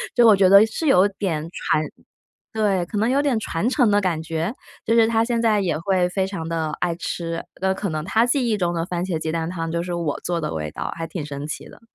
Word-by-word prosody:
就 240 -2 +6
我 215 - +8
觉 190 -1 +4
得 200 +2 +8
是 260 +8 -3
有 195 -7 +5
点 160 -6 -2
传 155 - 0 0.7
对， 200 -5 +1
可 205 - -4
能 220 - +2
有 275 +3 +2
点 275 -6 +1
传 205 0 -2
承 250 -5 +3
的 205 - +4
感 175 -5 -1
觉？ 165 +7 -3 0.3
就 225 - +1
是 230 -1 +5
他 225 0 +2
现 235 -1 0
在 220 -3 +3
也 180 -5 0
会 180 +1 +1
非 190 0 0
常 185 -5 -5
地 160 -2 -1
爱 175 -1 0
吃， 165 -1 -4
的 190 0 0
可 200 - -3
能 155 -2 -3
他 220 +5 +2
记 250 +1 +1
忆 215 - +1
中 175 -2 0
的 165 - -1
番 175 0 -2
茄 175 -4 -2
鸡 160 0 -3
蛋 165 0 -2
汤 165 -2 -4
就 170 0 -1
是 175 0 -4
我 170 -4 -2
做 175 -1 -1
的 155 - -3
味 75 -1 -3
道， - - -5
还 165 -1 -4
挺 160 -2 -5
神 145 0 -6
奇 155 - -6
的。 - - -15
185 Hz, 275 characters per minute, -22 LUFS, 165-215 Hz, 0.7 s, 我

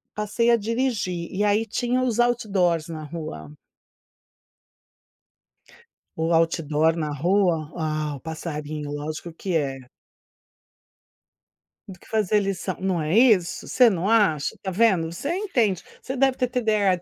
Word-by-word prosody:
passei 210 +3 0
a 235 - +5
dirigir. 220 -6 -2
E 200 +2 -1
aí, 210 +1 +3
tinha 245 +3 -1
os 240 -3 0
outdoors 195 -9 +1
na 160 -2 -6
rua. 145 - -7 2.6
O 165 +1 0
outdoor 165 -1 +2
na 155 -3 -2
rua? 170 0 +1
Ah, 155 -2 -2
o - - -9
passarinho, 150 -2 -5
lógico 155 +3 -5
que 180 +2 -3
é. 135 -3 -2 2.1
Do 185 -3 -11
que - - -19
fazer 215 -1 +2
lição. 195 -2 -2
Não 185 -2 0
é 155 +4 0
isso? 215 -8 +3
Você 250 -2 +5
não 185 +2 -1
acha? 195 -10 +2
Tá 190 - -2
vendo. 185 -5 +2
Você 185 - -5
entende. 240 - 0 0.2
Você 265 - -5
deve 270 0 +3
ter 250 - +1
TDAH. 215 -7 +1
185 Hz, 135 wpm, -24 LUFS, 160-220 Hz, 2.6 s, a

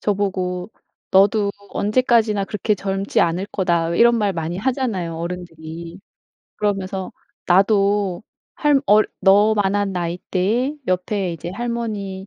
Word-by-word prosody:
저보고 190 -2 -2 0.4
"너도 200 +2 +4 0.2
언제까지나 215 -2 +2
그렇게 210 +1 -1
젊지 195 +1 -1
않을 175 +4 +1
거다." 170 -4 +1
왜 170 - -2
이런 235 0 +6
말 205 -3 +1
많이 165 0 -3
하잖아요 215 -9 -2
어른들이. 170 0 -7 0.6
그러면서 195 -2 -2 0.3
나도 200 0 +2 0.3
할 295 -2 +3
얼 210 +1 +5
너만한 205 0 +3
나이대에 185 - -1
옆에 185 0 -1
이제 170 +2 -7
할머니, 210 -3 -4
195 Hz, 270 characters per minute, -21 LUFS, 180-210 Hz, 0.6 s, 이런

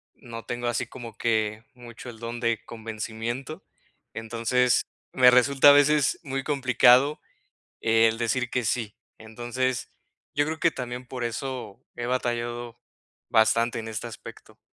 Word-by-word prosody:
no 115 -3 -9
tengo 120 +1 -4
así 120 +1 -1
como 115 -2 -10
que 110 -1 0
mucho 120 0 -11
el 110 -2 -11
don 120 +1 -6
de 115 -1 -1
convencimiento. 115 +5 -6 0.5
Entonces, 115 +1 +1 0.3
me 125 -1 +7
resulta 135 +3 +6
a - - +11
veces 145 -1 +4
muy 135 -1 -4
complicado 135 +1 +4 0.6
el 115 0 +3
decir 120 +1 -1
que 125 - 0
sí. 110 -1 -2 0.2
Entonces, 120 +3 -3 0.5
yo 145 0 +2
creo 160 0 -4
que 170 - +4
también 125 -2 -6
por 125 -2 -5
eso 120 -2 -5
he 120 - -4
batallado 120 -1 -3 0.5
bastante 115 +2 +3
en 110 - -6
este 110 +1 -5
aspecto. 115 - -11
120 Hz, 140 wpm, -26 LUFS, 115-130 Hz, 0.6 s, a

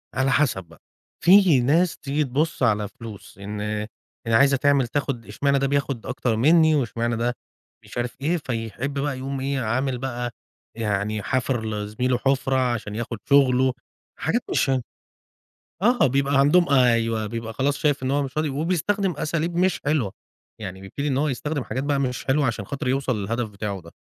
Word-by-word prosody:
على 135 +1 +2
حسب 130 -10 +2
بقى، 85 -1 -19 0.4
في 180 -6 +7
ناس 160 +8 +2
تيجي 145 +2 -1
تبُص 145 +3 -1
على 105 -3 +2
فلوس 105 -2 -11
إن 105 +1 -6 0.7
يعني 115 0 +3
عايزة 140 +1 +5
تعمل 140 -2 +3
تاخُد 135 -3 -2
اشمعنى 140 +8 +1
ده 135 - +1
بياخُد 140 -4 -1
أكتر 125 -2 -1
منّي 160 +6 +5
واشمعنى 120 -3 -1
ده 120 +1 0 0.5
مش - - -11
عارف 120 0 -2
إيه، 170 +5 +1
فيحب 125 -1 -4
بقى 140 -2 -1
يقوم 135 +1 -4
إيه، 135 0 -1
عامل 130 +3 0
بقى 120 -1 -3 0.5
يعني 105 -1 -1
حافر 130 -3 -1
لزميله 110 +4 -1
حُفرة 135 0 +1 0.2
عشان 105 -2 -5
ياخُد 115 0 -4
شغله. 130 -2 +4 0.5
حاجات - - 0
مش - - +1
ه 130 -1 +2 1.0
آه، 240 - +4
بيبقى 140 +1 +1
عندهم 170 +6 +4
أيوه، 115 -4 +3
بيبقى 115 +1 -5
خلاص 140 +4 0
شايف 145 -3 +1
إن 130 - -1
هو 145 +1 +2
مش 135 0 -6
راضي 155 -1 +1
وبيستخدم 180 +6 0
أساليب 165 +3 -2
مش 185 +1 +2
حلوة، 140 -10 0 0.5
يعني 95 -2 -6
بيبتدي 140 +10 -4
إن 135 -1 0
هو 150 - +1
يستخدم 145 +1 -2
حاجات 130 +2 -3
بقى 145 -1 +1
مش 125 -2 -2
حلوة 140 +1 +2
عشان 110 -3 -2
خاطر 140 +4 -4
يوصل 125 -4 0
للهدف 115 +3 -2
بتاعه 100 -1 -5
ده. 85 0 -14
130 Hz, 175 wpm, -24 LUFS, 115-145 Hz, 1.0 s, في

